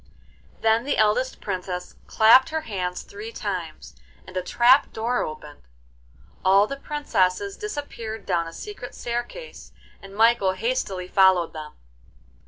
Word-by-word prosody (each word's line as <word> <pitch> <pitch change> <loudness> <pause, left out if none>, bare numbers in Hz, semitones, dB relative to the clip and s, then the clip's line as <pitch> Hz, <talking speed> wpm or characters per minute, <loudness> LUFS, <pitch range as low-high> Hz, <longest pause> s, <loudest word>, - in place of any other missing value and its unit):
Then 225 +1 +3
the 285 - -1
eldest 220 +5 +1
Princess 180 -2 -5
clapped 225 +4 +6
her 315 0 -2
hands 185 -9 -4
three 210 +3 -9
times 170 - -5 0.3
and 185 - -13
a 185 - 0
trap 240 +8 +4
door 235 +3 -1
opened. 150 -1 -7 0.8
All 195 +2 +5
the 275 - -5
princesses 200 -10 -1
disappeared 235 - -6
down 170 -3 0
a 165 - -9
secret 400 - -8
staircase, 240 - -6 0.3
and 195 0 -12
Michael 225 -3 +4
hastily 195 -4 -2
followed 190 -3 +4
them. 155 -1 -8
210 Hz, 130 wpm, -24 LUFS, 185-240 Hz, 0.8 s, clapped